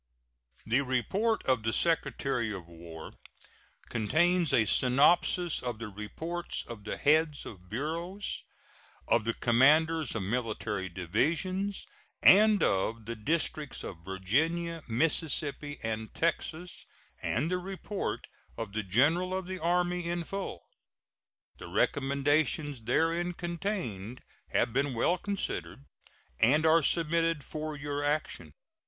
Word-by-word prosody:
The 120 Hz, +5 st, +2 dB
report 190 Hz, -, 0 dB
of 130 Hz, -3 st, +2 dB
the 110 Hz, +1 st, 0 dB
Secretary 135 Hz, -7 st, 0 dB
of 95 Hz, -4 st, -6 dB
War 85 Hz, -1 st, -10 dB, 0.8 s
contains 165 Hz, -, +2 dB
a 110 Hz, -, +4 dB
synopsis 150 Hz, -, +3 dB
of 120 Hz, -3 st, -3 dB
the 115 Hz, -1 st, -6 dB
reports 160 Hz, -, -5 dB
of 110 Hz, -3 st, -9 dB
the -, -, -3 dB
heads 155 Hz, 0 st, +2 dB
of 90 Hz, -3 st, -11 dB
bureaus, 165 Hz, -, -3 dB, 0.7 s
of 110 Hz, -, +3 dB
the 115 Hz, -, -1 dB
commanders 150 Hz, +5 st, +3 dB
of 110 Hz, -, -1 dB
military 105 Hz, -3 st, -2 dB
divisions, 165 Hz, -, -1 dB, 0.4 s
and 210 Hz, 0 st, +7 dB
of 110 Hz, +4 st, 0 dB
the 115 Hz, +1 st, -4 dB
districts 150 Hz, +4 st, -2 dB
of 85 Hz, -3 st, -8 dB
Virginia, 160 Hz, -, 0 dB
Mississippi, 145 Hz, +2 st, +1 dB
and 110 Hz, 0 st, -3 dB
Texas, 170 Hz, +1 st, -2 dB, 0.3 s
and 150 Hz, +9 st, -1 dB
the 180 Hz, -, +1 dB
report 195 Hz, +2 st, -4 dB, 0.3 s
of 115 Hz, -3 st, -5 dB
the 110 Hz, -, -1 dB
General 150 Hz, -, +2 dB
of 190 Hz, -1 st, -3 dB
the 185 Hz, 0 st, -5 dB
Army 175 Hz, +1 st, 0 dB
in 175 Hz, 0 st, -1 dB
full. 195 Hz, -, -5 dB, 1.0 s
The -, -, -8 dB
recommendations 145 Hz, 0 st, +1 dB
therein 165 Hz, +7 st, +1 dB
contained 170 Hz, -, -4 dB, 0.3 s
have 115 Hz, -, +1 dB
been 135 Hz, 0 st, 0 dB
well 175 Hz, +10 st, +2 dB
considered, 135 Hz, -, -4 dB, 0.5 s
and 150 Hz, +7 st, +4 dB
are 160 Hz, +1 st, +6 dB
submitted 165 Hz, -1 st, +1 dB
for 155 Hz, +1 st, -5 dB
your 145 Hz, 0 st, -3 dB
action. 145 Hz, -, -2 dB
145 Hz, 120 wpm, -30 LUFS, 115-170 Hz, 1.0 s, and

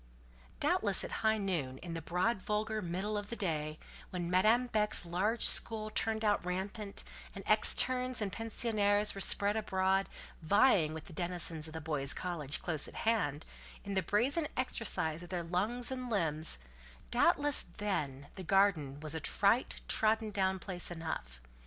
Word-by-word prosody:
Doubtless -, -, +2 dB
at -, -, -6 dB
high 220 Hz, 0 st, +3 dB
noon, 170 Hz, -11 st, -2 dB
in 170 Hz, +3 st, -7 dB
the 165 Hz, -, -4 dB
broad, 185 Hz, +6 st, 0 dB
vulgar 215 Hz, +2 st, -1 dB
middle 195 Hz, +4 st, -2 dB
of 205 Hz, 0 st, -9 dB
the 235 Hz, -, -4 dB
day, 155 Hz, -6 st, -2 dB, 0.3 s
when 175 Hz, -1 st, -4 dB
Madame 220 Hz, +7 st, +4 dB
Beck's 210 Hz, -5 st, +1 dB
large 195 Hz, +7 st, 0 dB
school 215 Hz, -1 st, +5 dB
turned 220 Hz, 0 st, 0 dB
out 205 Hz, -3 st, +2 dB
rampant, 195 Hz, +3 st, -4 dB, 0.3 s
and -, -, -8 dB
externes 255 Hz, -1 st, +2 dB
and 200 Hz, -4 st, -2 dB
pensionnaires 210 Hz, -2 st, +2 dB
were 195 Hz, -, -6 dB
spread 200 Hz, +2 st, +2 dB
abroad, 195 Hz, -2 st, +1 dB, 0.3 s
vying 170 Hz, -3 st, +3 dB
with 160 Hz, -, -7 dB
the -, -, -13 dB
denizens 170 Hz, -2 st, -3 dB
of 155 Hz, -, -10 dB
the 160 Hz, -, -4 dB
boys' 145 Hz, -3 st, -1 dB
college 155 Hz, -6 st, -3 dB
close 160 Hz, -4 st, -2 dB
at -, -, -12 dB
hand, 170 Hz, -10 st, 0 dB, 0.4 s
in 200 Hz, -, -5 dB
the 190 Hz, -, +2 dB
brazen 270 Hz, -, +1 dB
exercise 180 Hz, -10 st, 0 dB
of 175 Hz, -, -10 dB
their 180 Hz, -2 st, -3 dB
lungs 210 Hz, +9 st, -1 dB
and 255 Hz, -1 st, -4 dB
limbs—doubtless 145 Hz, -, 0 dB, 0.2 s
then 145 Hz, -10 st, -2 dB
the 190 Hz, -, -8 dB
garden 175 Hz, -7 st, +2 dB
was 155 Hz, -1 st, -3 dB
a 160 Hz, -, -2 dB
trite, -, -, +3 dB
trodden 220 Hz, 0 st, +2 dB
down 190 Hz, -2 st, 0 dB
place 180 Hz, -1 st, -6 dB
enough. 160 Hz, -, -5 dB
190 Hz, 160 wpm, -33 LUFS, 160-215 Hz, 0.4 s, school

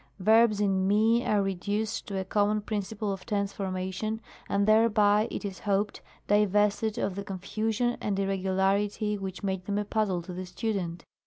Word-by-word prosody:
Yerbs 220 Hz, +2 st, +5 dB
in 195 Hz, -2 st, +2 dB
fu 220 Hz, +3 st, +4 dB
are 205 Hz, -1 st, +3 dB
reduced 205 Hz, +4 st, -2 dB
to 200 Hz, -, -3 dB
a 190 Hz, -, -2 dB
common 210 Hz, +2 st, +1 dB
principle 205 Hz, 0 st, -3 dB
of 195 Hz, -, -8 dB
Tense 200 Hz, -3 st, -1 dB
formation, 190 Hz, +3 st, -3 dB, 0.3 s
and 200 Hz, +1 st, +1 dB
thereby, 215 Hz, -1 st, +4 dB
it -, -, -5 dB
is 195 Hz, -2 st, -5 dB
hoped, 205 Hz, 0 st, -1 dB, 0.3 s
divested 210 Hz, +1 st, +2 dB
of 195 Hz, -, -1 dB
the 200 Hz, +2 st, -5 dB
confusion 220 Hz, +5 st, -1 dB
and 200 Hz, -2 st, -1 dB
irregularity 195 Hz, +2 st, 0 dB
which 190 Hz, -1 st, -6 dB
made 190 Hz, -2 st, -2 dB
them 200 Hz, +1 st, -1 dB
a 210 Hz, -, -1 dB
puzzle 200 Hz, -5 st, 0 dB
to 180 Hz, -, -8 dB
the 185 Hz, +1 st, -6 dB
student. 180 Hz, -4 st, -3 dB
205 Hz, 165 wpm, -28 LUFS, 190-215 Hz, 0.3 s, Yerbs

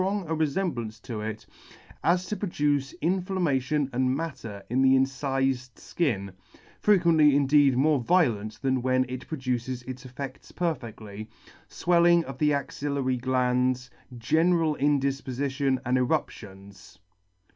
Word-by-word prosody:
g 185 Hz, -, +1 dB
a 195 Hz, -5 st, -2 dB
refemblance 140 Hz, -, -2 dB
to 110 Hz, -3 st, -6 dB
it, 110 Hz, 0 st, -5 dB, 0.6 s
as 180 Hz, +2 st, +2 dB
to 210 Hz, -, -3 dB
produce 145 Hz, -8 st, -1 dB
inflammation 160 Hz, -6 st, 0 dB
and 130 Hz, +1 st, +1 dB
matter 115 Hz, -11 st, -6 dB
in 125 Hz, +3 st, +1 dB
the 135 Hz, 0 st, +5 dB
incifed 135 Hz, -2 st, 0 dB
fkin 100 Hz, -, -2 dB, 0.5 s
(frequently 165 Hz, -8 st, +4 dB
indeed 140 Hz, -2 st, +4 dB
more 145 Hz, +1 st, +3 dB
violent 115 Hz, -, +1 dB
than 130 Hz, -1 st, +1 dB
when 130 Hz, +1 st, +2 dB
it 130 Hz, 0 st, -7 dB
produces 125 Hz, -4 st, -3 dB
its 130 Hz, 0 st, -8 dB
effects 130 Hz, +1 st, -8 dB
perfectly), 115 Hz, -, -4 dB, 0.4 s
fwelling 170 Hz, 0 st, +3 dB
of 135 Hz, -3 st, -9 dB
the 150 Hz, -1 st, +3 dB
axillary 140 Hz, -2 st, -1 dB
glands, 125 Hz, 0 st, 0 dB, 0.3 s
general 160 Hz, +5 st, +2 dB
indifpofition, 135 Hz, -1 st, 0 dB
and 125 Hz, +1 st, +2 dB
eruptions. 100 Hz, -, -4 dB
135 Hz, 120 wpm, -27 LUFS, 125-155 Hz, 0.6 s, the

